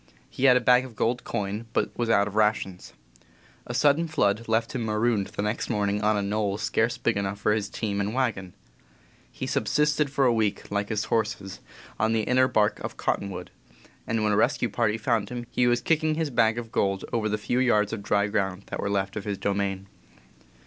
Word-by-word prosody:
He 135 - -1
had 125 -2 +7
a - - 0
bag 125 +1 +5
of 125 -3 -10
gold 120 +3 0
coin, 105 +3 -3
but - - -1
was 120 -1 -1
out 100 -2 +4
of 105 - -7
rations. 105 -4 0 0.7
A - - -4
sudden 150 +3 +3
flood 115 -8 0
left 115 +1 0
him 125 - -2
marooned 110 -1 +1
the 100 - -4
next 105 +2 -2
morning 105 -2 0
on 105 0 +2
a 100 - 0
knoll 100 0 -1
scarce 110 +2 0
big 115 - 0
enough 100 0 -2
for 105 - +1
his 105 -1 -2
team 100 -3 -2
and 100 +1 -1
wagon. 110 -8 -2 0.8
He - - -5
sub - - -1
sisted 150 -1 +2
for 135 0 +1
a 120 - +4
week, 105 -3 -1
like 100 0 -1
his 110 -1 -1
horses, 105 -3 -2 0.4
on 110 0 +2
the 110 -1 +1
inner 130 +2 +3
bark 110 -5 +1
of - - -6
Cottonwood, 90 -2 -3 0.6
and 115 -1 0
when 105 - +2
a - - +2
rescue 115 +2 +2
party 110 0 0
found 110 -1 0
him 120 -1 -5
he 125 - +2
was 120 0 +2
kicking 155 +2 +1
his 160 -2 -2
bag 115 -2 +3
of 115 -1 -6
gold 95 -1 0
over 110 -2 0
the 105 - 0
few 120 +4 -1
yards 105 -4 +2
of 110 - -4
dry 100 0 +1
ground 100 -2 -2
that - - -4
were 100 - -1
left 100 -1 -1
of 105 - -5
his 100 -2 -2
domain. 100 -1 -2
110 Hz, 215 wpm, -26 LUFS, 100-120 Hz, 0.8 s, had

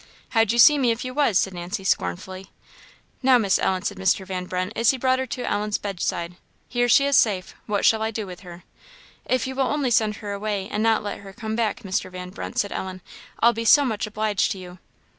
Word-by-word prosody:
"How'd 225 -3 +2
you 235 - -1
see 290 +5 +7
me 255 -3 +2
if 230 +2 -1
you 255 - -5
was?" 275 -8 +2
said 190 - +1
Nancy, 175 +2 -5
scornfully. 185 - -2 0.7
"Now, 260 -1 +5
Miss 200 -5 +2
Ellen," 185 0 0
said - - -3
Mr. 190 0 +1
Van 185 -1 -4
Brunt, 185 +3 -3
as 230 -1 +3
he 265 - +2
brought 260 0 +1
her 260 - -2
to 250 +1 -4
Ellen's 210 0 -1
bedside, 180 -3 -3 0.3
"here 245 0 0
she 275 +4 +5
is 280 0 +2
safe; 190 -5 +2
what 205 -1 0
shall 220 -1 +4
I 220 - 0
do 220 -1 -4
with 180 -2 -9
her?" 175 -2 -12 0.6
"If 255 -1 0
you 265 - -4
will 265 -1 0
only 280 -3 0
send 215 -2 +2
her 205 -1 -7
away, 200 -1 -3
and 210 - -1
not 225 -1 +2
let 205 - -5
her 195 -1 -12
come 220 0 -5
back, 225 -2 -1
Mr. 190 -1 -2
Van 180 0 -8
Brunt," 225 +4 -7
said 205 -4 0
Ellen, 185 -1 -5 0.4
"I'll 235 +1 +5
be 230 0 -4
so 285 +6 +6
much 220 -4 -2
obliged 215 -1 0
to - - -10
you!" 180 -1 -11
210 Hz, 235 wpm, -23 LUFS, 190-235 Hz, 0.7 s, see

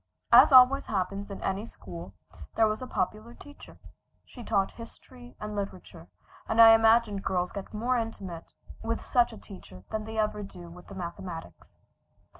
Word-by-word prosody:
As - - +8
always 260 +1 +7
happens 200 0 -3
in 200 - -8
any 195 +2 -2
school 90 - -10 0.4
there 225 - +4
was 215 +2 -3
a 255 - -6
popular 215 +5 -3
teacher. 290 0 -14 0.5
She 245 - -12
taught 200 -4 0
history 245 +1 -13
and 210 0 -6
literature, 190 - -7 0.4
and 225 - 0
I 225 0 +10
imagine 225 -2 +3
girls 180 -2 -1
get 200 - -8
more 240 +4 -1
intimate 195 -7 -7 0.3
with 230 0 -2
such 240 -1 +2
a 225 - -11
teacher 90 - -13
than 215 -1 -3
they 220 0 -7
ever 210 -1 -1
do 175 -4 -10
with 180 +1 -14
the 195 - -11
mathematics. 170 -1 -8
210 Hz, 165 wpm, -28 LUFS, 185-230 Hz, 0.5 s, I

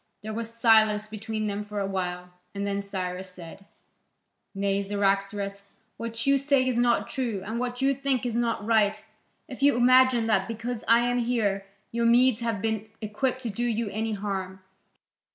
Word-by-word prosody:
There 215 0 -5
was 225 +1 -4
silence 220 -2 +4
between 215 0 -4
them 205 0 -2
for 210 0 -5
a 200 - 0
while, 180 -2 -4 0.2
and 200 0 -2
then 200 0 -1
Cyrus 185 -2 -5
said: 180 +1 -12 0.9
"Nay, 200 0 0
Cyaxares, 200 0 -1 0.4
what 230 0 -4
you 275 0 +4
say 275 -2 +2
is 255 - 0
not 240 0 +2
true, 235 -8 -3
and 225 +3 -3
what 250 +1 -3
you 275 +1 +4
think 270 -2 -1
is 235 -2 -2
not 230 -3 -1
right, 215 -1 +2 0.4
if 260 0 -9
you 285 -1 +5
imagine 255 -1 +5
that 195 -4 +1
because 230 +1 -4
I 230 +1 +6
am 245 +1 +1
here, 215 -5 0 0.2
your 235 0 +1
Medes 245 0 +4
have 230 -4 -2
been 220 -1 -2
equipt 240 +5 -2
to 230 - -2
do 235 +5 -3
you 230 -2 -1
any 220 +2 -2
harm. 190 -2 -4
220 Hz, 175 wpm, -26 LUFS, 200-240 Hz, 0.9 s, I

